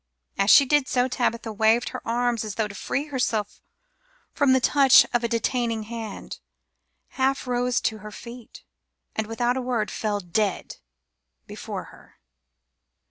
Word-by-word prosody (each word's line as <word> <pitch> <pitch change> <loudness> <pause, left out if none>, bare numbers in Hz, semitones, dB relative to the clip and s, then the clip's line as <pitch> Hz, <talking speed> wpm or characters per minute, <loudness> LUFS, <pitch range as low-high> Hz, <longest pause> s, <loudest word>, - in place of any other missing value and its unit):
As 195 +1 +1
she 280 - +8
did 290 0 +2
so 250 0 +1
Tabitha 235 -3 -2
waved 220 +3 +2
her - - -7
arms 240 -1 0
as 215 -2 -6
though 220 -2 0
to 205 - -10
free 275 +7 -3
herself 225 -6 -2 0.7
from 285 -3 +2
the 260 - +5
touch 275 0 +6
of 240 0 +1
a - - +1
detaining 230 -1 -1
hand, 225 -1 -7 0.7
half 270 0 -1
rose 245 0 0
to 220 -1 -2
her 210 +1 -9
feet, 235 +2 -11 0.5
and 220 -1 -2
without 240 +2 -1
a - - -1
word 240 -4 -2
fell 210 -2 -2
dead 195 +2 -2 0.7
before - - -7
her. - - -19
235 Hz, 150 wpm, -24 LUFS, 220-250 Hz, 0.7 s, she